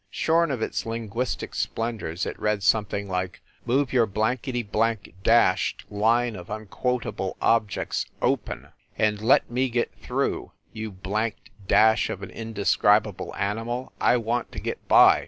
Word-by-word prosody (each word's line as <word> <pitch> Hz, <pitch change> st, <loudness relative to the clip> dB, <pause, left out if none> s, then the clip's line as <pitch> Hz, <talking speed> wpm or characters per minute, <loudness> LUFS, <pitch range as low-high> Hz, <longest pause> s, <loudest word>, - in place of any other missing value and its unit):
Shorn 165 Hz, +8 st, +2 dB
of 125 Hz, -5 st, -2 dB
its -, -, -2 dB
linguistic 115 Hz, +2 st, -3 dB
splendors 105 Hz, -7 st, -2 dB
it -, -, -5 dB
read 105 Hz, -2 st, 0 dB
something 100 Hz, +2 st, +1 dB
like: 90 Hz, -1 st, -3 dB, 0.3 s
"Move 135 Hz, +2 st, +1 dB
your 120 Hz, -3 st, +4 dB
blankety 120 Hz, +4 st, -1 dB
blank 110 Hz, 0 st, -1 dB
dashed 115 Hz, -3 st, +3 dB
line 115 Hz, +3 st, +2 dB
of 90 Hz, -2 st, -9 dB
unquotable 110 Hz, +4 st, -3 dB
objects 110 Hz, -4 st, +1 dB
open, -, -, -1 dB, 0.3 s
and 105 Hz, -1 st, +1 dB
let 115 Hz, +1 st, +4 dB
me 130 Hz, +2 st, +1 dB
get 120 Hz, 0 st, -1 dB
through, -, -, -2 dB, 0.2 s
you 110 Hz, 0 st, -5 dB
blanked 105 Hz, +4 st, -3 dB, 0.2 s
dash 110 Hz, +3 st, +4 dB
of 100 Hz, -, -5 dB
an 95 Hz, -, -7 dB
indescribable 105 Hz, -2 st, +1 dB
animal, 115 Hz, +5 st, -3 dB
I 125 Hz, -, +4 dB
want 120 Hz, +1 st, -2 dB
to -, -, -4 dB
get -, -, -5 dB
by -, -, +7 dB
110 Hz, 140 wpm, -25 LUFS, 105-120 Hz, 0.3 s, by